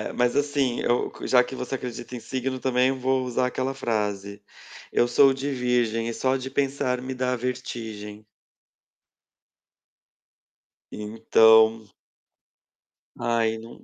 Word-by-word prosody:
Mas, 125 0 +1
assim, 140 -4 0
eu 120 - 0
qua - - -8
já 125 -1 +5
que 125 - -9
você 125 +1 -4
acredita 125 -1 -7
em - - -6
signo, 130 +1 -4
também, 130 0 +2
vou 130 0 0
usar 125 0 0
aquela 130 +1 -2
frase: 105 -5 -3 0.5
"Eu 120 - +3
sou 135 +2 +5
de 135 +2 -4
virgem 120 -3 0
e 115 - -3
só 130 +2 0
de 130 0 -6
pensar 135 -2 -1
me 130 +1 -5
dá 125 0 -1
vertigem". 110 -4 -6 2.7
Então 110 +1 +4 1.3
Ai 115 -1 0
nã 115 +1 -11
125 Hz, 125 wpm, -25 LUFS, 115-130 Hz, 2.7 s, já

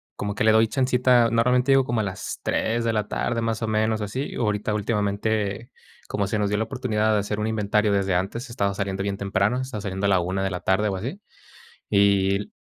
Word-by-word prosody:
como 100 0 -3
que - - -1
le 110 - +5
doy 110 +1 +5
chancita, 125 -1 +3
normalmente 125 +3 +2
llego 135 -1 +4
como 120 -3 -1
a - - +1
las 95 -1 -5
3 115 +1 0
de 115 -1 0
la 105 -1 -1
tarde, 115 -1 -1
más 115 -1 -2
o 110 - -1
menos, 110 0 0
así, 115 +7 -4
ahorita 105 -1 -1
últimamente, 105 +1 -1 0.4
como 100 - -1
se 105 +2 -1
nos 105 -1 +1
dio 105 - 0
la 110 - +1
oportunidad 110 -3 0
de 105 - +3
hacer 105 +1 -3
un 105 - -1
inventario 105 -1 +1
desde 100 -2 +1
antes, 110 +8 -2
estaba 100 -4 -1
saliendo 95 -1 -3
bien 100 0 -2
temprano, 100 +4 0
estaba 130 -5 -5
saliendo 95 0 -3
a - - +3
la 95 -2 +4
1 95 +2 -2
de 95 - 0
la 90 - -4
tarde 95 +3 +1
o 95 - -2
así, 125 - -5 0.7
y 100 -1 +3
l 100 - -5
105 Hz, 230 wpm, -24 LUFS, 100-115 Hz, 0.7 s, le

